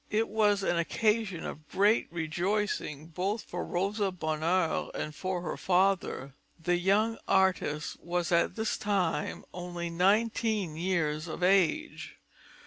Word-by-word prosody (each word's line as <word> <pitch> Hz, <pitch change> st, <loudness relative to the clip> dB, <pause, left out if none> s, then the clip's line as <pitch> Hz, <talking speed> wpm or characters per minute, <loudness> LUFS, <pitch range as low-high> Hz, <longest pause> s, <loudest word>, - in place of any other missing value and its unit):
It 220 Hz, +2 st, +1 dB
was 210 Hz, -2 st, +2 dB
an 175 Hz, -2 st, +1 dB
occasion 210 Hz, +1 st, 0 dB
of 155 Hz, +1 st, -8 dB
great 205 Hz, +1 st, +2 dB
rejoicing 170 Hz, -2 st, -2 dB
both 185 Hz, +7 st, -2 dB
for 175 Hz, -, -5 dB
Rosa 195 Hz, +2 st, -1 dB
Bonheur 165 Hz, +1 st, 0 dB
and 155 Hz, -, -4 dB
for 185 Hz, +1 st, -3 dB
her 160 Hz, -, -3 dB
father. 185 Hz, -7 st, +1 dB, 0.3 s
The 175 Hz, +2 st, +1 dB
young 210 Hz, +5 st, +2 dB
artist 185 Hz, -5 st, +1 dB
was 175 Hz, 0 st, -2 dB
at 170 Hz, 0 st, +2 dB
this 220 Hz, -1 st, -1 dB
time 195 Hz, -5 st, -1 dB
only 175 Hz, -1 st, -5 dB
nineteen 205 Hz, 0 st, +1 dB
years 160 Hz, -3 st, -1 dB
of 165 Hz, +2 st, -5 dB
age. 195 Hz, -, +1 dB
180 Hz, 130 wpm, -30 LUFS, 170-205 Hz, 0.3 s, was